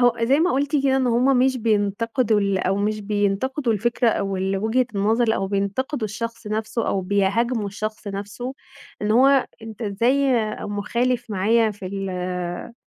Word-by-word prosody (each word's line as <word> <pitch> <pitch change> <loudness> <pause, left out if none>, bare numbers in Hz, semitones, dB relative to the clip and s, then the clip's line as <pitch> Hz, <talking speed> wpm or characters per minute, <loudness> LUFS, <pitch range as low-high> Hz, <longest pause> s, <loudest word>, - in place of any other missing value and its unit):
هو 245 -1 +3
زَي 270 +6 +3
ما 360 - +3
قُلتِ 280 +1 0
كده 265 0 +3
إن 260 -1 +1
هُم 250 +3 +3
مش 260 +1 +3
بينتقدوا 220 +1 +1
ال 200 -1 +1
أو 190 +1 0
مش 210 +1 -1
بينتقدوا 210 +6 0
الفكرة 235 +3 +1
أو 195 -3 -1
ال 190 +1 -1
وجهة 230 +4 +1
النظر 220 +3 +2
أو 195 - -1
بينتقدوا 205 +6 -1
الشخص 230 +1 -6
نَفْسه 220 +2 -2
أو 195 - 0
بيهاجموا 205 +4 0
الشخص 215 +1 -5
نَفْسه، 205 +6 -5 0.5
إن 210 - 0
هو 270 +2 +5 0.2
أنت 225 +1 -8
إزاي 245 +6 +2 0.3
مخالف 235 +4 -1
معايا 215 +3 +2
في 195 -2 -9
ال 195 0 -4
آآ 180 +2 -4
220 Hz, 165 wpm, -22 LUFS, 200-245 Hz, 0.5 s, هو